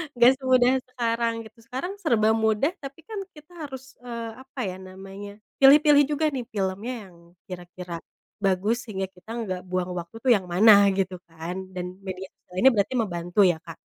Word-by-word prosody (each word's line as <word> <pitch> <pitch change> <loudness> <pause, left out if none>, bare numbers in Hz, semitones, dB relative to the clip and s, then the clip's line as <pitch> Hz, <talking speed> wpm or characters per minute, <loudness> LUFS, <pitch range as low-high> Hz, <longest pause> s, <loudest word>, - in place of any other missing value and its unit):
nggak 240 +1 +7
semudah 255 -2 +4 0.2
sekarang 235 -2 -1
gitu 220 +1 -16
sekarang 265 +9 -4
serba 230 - +2
mudah 220 +6 +2
tapi 275 +2 -9
kan 425 +5 -6 0.2
kita 300 +3 -16 0.2
harus, 265 -2 -8 0.2
eee, 235 -2 -6
apa 265 +1 -12
ya 185 -3 -3
namanya, 195 +2 -9 0.3
pilih-pilih 290 +1 +7
juga 310 +2 0
nih 255 -4 -4
filmnya 200 +2 -3 0.2
yang - - -19 0.3
kira-kira, 175 -1 -8 0.4
bagus 195 +2 +1
sehingga 190 -2 -4
kita 185 +4 -20
nggak 185 -3 -4
buang 180 0 -2
waktu 175 +3 -6
tuh 255 - +4
yang 195 -6 +3
mana 200 +3 +7
gitu 190 -2 -1
kan 170 +3 -6
dan 180 +1 -6
media 190 -1 -7
sosial 180 - -18
ini 265 - +9
berarti 210 +1 0
membantu 175 -5 -2
ya 175 -3 +4
Kak, 165 -2 -8
205 Hz, 175 wpm, -25 LUFS, 185-250 Hz, 0.4 s, ini